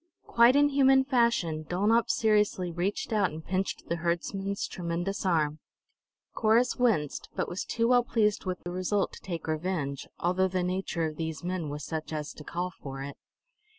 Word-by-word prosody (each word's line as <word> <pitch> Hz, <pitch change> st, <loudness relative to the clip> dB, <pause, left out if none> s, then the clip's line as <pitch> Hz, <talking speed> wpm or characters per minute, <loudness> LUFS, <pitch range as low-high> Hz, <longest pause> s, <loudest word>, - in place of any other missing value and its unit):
Quite 235 Hz, +2 st, +5 dB
in 290 Hz, 0 st, +5 dB
human 270 Hz, -1 st, +5 dB
fashion, 235 Hz, -, +1 dB
Dulnop 205 Hz, +8 st, +2 dB
seriously 210 Hz, -5 st, +2 dB
reached 180 Hz, +6 st, -2 dB
out 200 Hz, -4 st, +3 dB
and 160 Hz, +1 st, -9 dB
pinched 190 Hz, +1 st, -2 dB
the 170 Hz, -, -1 dB
herdsman's 195 Hz, +4 st, -2 dB
tremendous 175 Hz, +3 st, -3 dB
arm. 155 Hz, -3 st, +1 dB, 0.7 s
Corrus 230 Hz, +3 st, +3 dB
winced, 210 Hz, -, 0 dB
but -, -, -1 dB
was 180 Hz, -, -3 dB
too 230 Hz, 0 st, 0 dB
well 245 Hz, -1 st, +5 dB
pleased 215 Hz, -4 st, +1 dB
with 185 Hz, -1 st, -2 dB
the 175 Hz, -, -5 dB
result 185 Hz, +2 st, 0 dB
to -, -, -11 dB
take 170 Hz, -4 st, -5 dB
revenge, 155 Hz, -4 st, -2 dB
although 185 Hz, +2 st, +1 dB
the 185 Hz, -1 st, -1 dB
nature 180 Hz, -2 st, -1 dB
of 155 Hz, -1 st, -4 dB
these 160 Hz, -2 st, -4 dB
men 175 Hz, -3 st, -2 dB
was 145 Hz, 0 st, -5 dB
such 160 Hz, 0 st, -4 dB
as 150 Hz, -1 st, -4 dB
to 150 Hz, -, -11 dB
call 175 Hz, +4 st, -3 dB
for 135 Hz, -4 st, -7 dB
it. 140 Hz, 0 st, -7 dB
185 Hz, 175 wpm, -29 LUFS, 160-215 Hz, 0.7 s, Quite